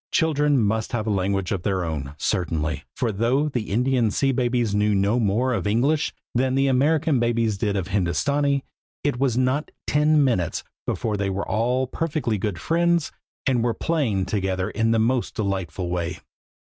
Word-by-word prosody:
Children 150 -3 +2
must 110 0 0
have 110 -3 -1
a 110 - 0
language 95 -1 0
of 95 - -1
their 95 -1 0
own, 75 -3 -4
certainly, 80 -6 -1
for 120 -3 0
though 120 +8 +1
the 120 -6 -3
Indian 125 +1 +2
sea 135 +6 +1
babies 120 -4 0
knew 105 0 +2
no 100 +5 +2
more 115 +4 +1
of 110 - -1
English 135 +9 +1 0.2
than 130 +1 +1
the 135 0 +3
American 140 +2 +2
babies 115 -2 +1
did 100 0 -1
of 95 -2 -2
Hindostanee, 140 +9 +1 0.4
it 145 -4 0
was 130 -3 +1
not 130 +4 +1 0.2
ten 150 0 +3
minutes 115 - 0 0.2
before 110 -3 -1
they 100 -1 -1
were 95 +1 -3
all 125 +4 +1
perfectly 135 -6 -2
good 95 -3 -2
friends, 170 - +1 0.3
and 125 -3 +2
were 120 -1 0
playing 125 - 0
together 95 -2 -1
in 115 0 +1
the 115 - +3
most 120 +2 0
delightful 95 -4 -2
way. 90 -1 -2
115 Hz, 170 wpm, -24 LUFS, 100-135 Hz, 0.4 s, the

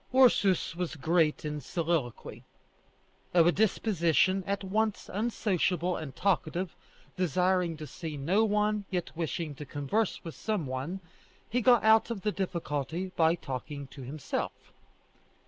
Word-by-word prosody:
Ursus 205 -10 +4
was 175 -2 -3
great 155 +1 +1
in 150 -1 -3
soliloquy. 160 -4 -2 0.9
Of 170 -2 +7
a 175 - +6
disposition 190 -3 +2
at 200 0 -1
once 215 +2 0
unsociable 185 -5 0
and 150 -4 -6
talkative, 180 -2 0 0.4
desiring 180 -1 +1
to 155 - -6
see 155 +1 -6
no 180 +10 +2
one, 210 -1 +1
yet 180 -3 -3
wishing 160 -1 -3
to 145 - -8
converse 145 +10 -1
with 165 - -6
some 210 -8 -2
one, 135 +9 -4 0.5
he 250 +3 0
got 240 0 +5
out 220 +1 +5
of 230 -5 -4
the 210 - 0
difficulty 170 -2 -3
by 160 0 +4
talking 140 -1 -6
to 135 - -11
himself. 140 +3 -5
175 Hz, 135 wpm, -30 LUFS, 155-200 Hz, 0.9 s, Of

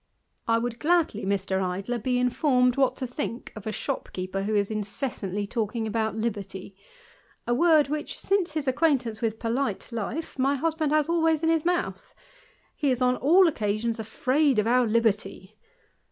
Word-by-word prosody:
I 230 0 +3
would 235 0 -3
gladly, 320 - +1
Mr. 195 -1 0
Idler, 195 +7 -2
be 250 +3 0
informed 250 0 +2
what 270 -1 +2
to 260 - -4
think 250 -1 -5
of 215 -1 -8
a - - -1
shopkeeper 185 -2 -4
who 210 +2 -1
is 205 0 +1
incessantly 205 -2 -3
talking 225 +1 -2
about 220 -1 -1
liberty; 200 -4 -4 0.7
a 240 - +1
word 310 +1 +4
which, 300 +1 -4
since 390 -4 0
his 305 -3 -3
acquaintance 260 -6 +1
with 225 -1 -1
polite 230 -1 -2
life, 235 +7 -4
my 275 +2 +2
husband 315 +1 -1
has 305 -1 +3
always 325 -2 +2
in 325 - +3
his 325 -1 +1
mouth: 350 0 -2 0.6
he 290 - 0
is 250 -2 +1
on 250 0 +3
all 350 +7 +5
occasions 225 -3 -1
afraid 255 +4 +1
oi - - +3
our 245 +2 +3
liberty. 215 -3 0
240 Hz, 165 wpm, -26 LUFS, 215-290 Hz, 0.7 s, all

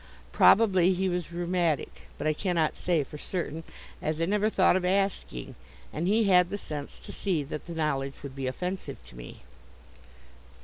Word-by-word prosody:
Probably 190 -4 +5
he 190 +1 0
was 175 -2 -3
rheumatic, 175 -3 -1
but - - -5
I 155 - +3
cannot 170 -2 0
say 170 -4 +1
for 150 +2 -10
certain, 165 -3 -4 0.4
as 155 +1 -1
I 165 - +2
never 210 +3 +2
thought 190 -4 +4
of 185 - +1
asking, 190 - -1 0.4
and 165 +3 -1
he 220 +3 +4
had 180 -3 +5
the 200 - -3
sense 150 -7 -6
to - - -8
see 180 -7 -1
that 150 +3 -7
the 170 - -6
knowledge 140 -4 -2
would 135 -2 -7
be 135 -1 -3
offensive 180 +8 -4
to - - -14
me. - - -10
175 Hz, 175 wpm, -28 LUFS, 150-185 Hz, 0.4 s, Probably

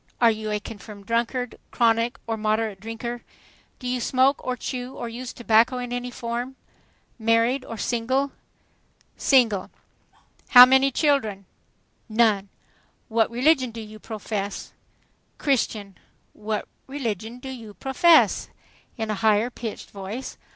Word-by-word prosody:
"Are 235 -2 +6
you 215 0 -4
a 210 0 0
confirmed 205 -1 -10
drunkard, 235 +2 -1
chronic 230 +2 +2
or 225 - -2
moderate 215 -1 -1
drinker?" 225 +3 -5 0.6
"Do 250 - -7
you 250 0 -1
smoke 260 +3 +2
or 255 0 -2
chew 250 +1 -5
or 240 - -5
use 245 +2 -6
tobacco 235 +2 +3
in 245 -1 -4
any 245 0 -3
form?" 245 +2 -4 0.6
"Married 230 +4 +2
or 230 - -7
single?" 260 +5 0 0.8
"Single." 230 -8 +3 0.8
"How 250 -1 +11
many 265 +1 +4
children?" 250 -9 +1 0.6
"None." 215 -3 +2 0.6
"What 225 -1 +2
religion 260 +2 +3
do 230 0 -8
you 215 0 -9
profess?" 210 -2 -5 0.6
"Christian." 215 - -1 0.3
"What 215 0 -3 0.2
religion 235 -4 -4
do 265 +2 -8
you 225 -5 -9
profess?" 320 +5 +4 0.5
in 220 -2 -2
a 210 - -4
higher 220 +2 +3
pitched 230 -3 -7
voice. 205 +6 -6
230 Hz, 130 wpm, -24 LUFS, 215-255 Hz, 0.8 s, How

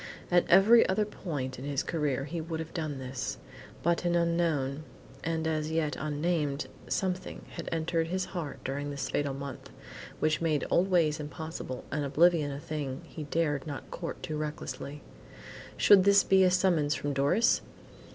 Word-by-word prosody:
At 175 0 +4
every 210 +6 +7
other 210 +3 +2
point 140 -11 -5
in 130 - -6
his 140 0 -1
career 145 -5 -1
he 160 +4 -4
would 160 0 -4
have 160 0 -6
done 155 -5 -3
this, 130 - -4 0.5
but 170 +1 +2
an 175 0 +1
unknown, 165 -5 +1 0.4
and 160 0 -1
as 155 -1 -1
yet 160 -3 0
unnamed, 150 -1 -1 0.2
something 185 -1 -2
had - - -6
entered 165 0 0
his 185 +2 -1
heart 160 -7 -5
during 145 +2 -3
this 140 -1 -4
fatal 145 -2 -1
month, 140 -1 -7 0.5
which 155 +1 +1
made 155 -3 +1
old 185 +3 +3
ways 165 -4 +3
impossible 150 -3 -6
and 150 +1 -1
oblivion 155 +1 +3
a 140 - -5
thing 145 -2 -4
he 155 -2 -7
dared 150 -1 0
not 145 -2 -7
court 170 - -6
too 155 - -3
recklessly. 150 -1 -5 0.7
Should 200 -2 +7
this 200 0 +6
be 190 0 +5
a 185 - +6
summons 175 -5 +2
from 145 0 -2
Doris! 140 - +3
155 Hz, 165 wpm, -30 LUFS, 145-175 Hz, 0.7 s, every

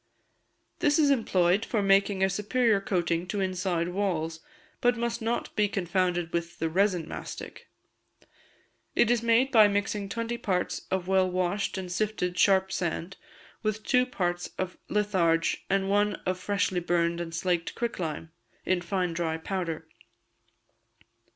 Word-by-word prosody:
This 290 0 +3
is 295 -3 +4
employed 195 -6 +2
for 215 -3 -1
making 195 0 +3
a 190 - +4
superior 210 +1 +2
coating 175 -3 -1
to 205 +2 -2
inside 185 -2 -1
walls, 170 -4 -1 0.4
but 245 0 +3
must 235 0 -2
not 230 +2 -2
be 210 -1 +3
confounded 180 -3 -1
with 170 0 -3
the 165 - -1
resin 180 -1 +1
mastic. - - -8 1.3
It 240 - +4
is 240 -2 +2
made 235 +3 +3
by 220 -4 +7
mixing 200 0 -1
twenty 230 +3 -3
parts 180 -3 -2
of 185 -1 -1
well 190 -1 +3
washed 185 +3 -1
and 185 -2 -5
sifted 180 -2 -1
sharp 190 0 +3
sand 175 +1 -3 0.5
with 215 -1 -2
two 250 -1 +3
parts 175 -7 -2
of 185 -1 -3
litharge 185 -6 +1
and 195 0 +1
one 205 +1 +2
of 185 0 -1
freshly 200 -2 0
burned 170 0 0
and 170 -1 -5
slaked 170 0 -1
quicklime, 165 -9 -3 0.3
in 185 -1 +1
fine 180 0 -1
dry 165 -1 -1
powder. 165 -2 -4
190 Hz, 145 wpm, -28 LUFS, 175-210 Hz, 1.3 s, by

